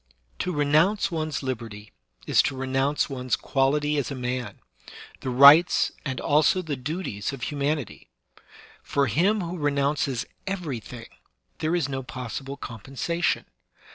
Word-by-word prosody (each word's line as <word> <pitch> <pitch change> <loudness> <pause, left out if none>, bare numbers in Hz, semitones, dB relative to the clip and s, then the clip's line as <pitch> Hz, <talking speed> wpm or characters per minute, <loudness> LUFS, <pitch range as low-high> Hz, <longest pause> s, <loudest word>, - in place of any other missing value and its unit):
To 180 - -1
renounce 155 +7 +2
one's 155 -4 -2
liberty 115 -5 -5 0.3
is - - +4
to 135 - -8
renounce 135 +2 0
one's 130 -3 -1
quality 145 +2 +1
as 140 - -2
a 140 - -4
man, 125 -1 -4 0.6
the 130 - -4
rights 140 +7 +7
and 130 -3 -3
also 155 +6 +3
the 155 -4 -3
duties 140 - -4
of 135 -4 -7
humanity. 145 -2 -3 0.7
For 140 -1 0
him 185 - +2
who 175 0 -5
renounces 140 -3 0 0.2
everything 135 - -5 0.5
there 160 +2 0
is 170 -6 0
no 135 -1 -3
possible 130 +2 -6
compensation. 135 +8 -2
140 Hz, 130 wpm, -25 LUFS, 130-155 Hz, 0.7 s, rights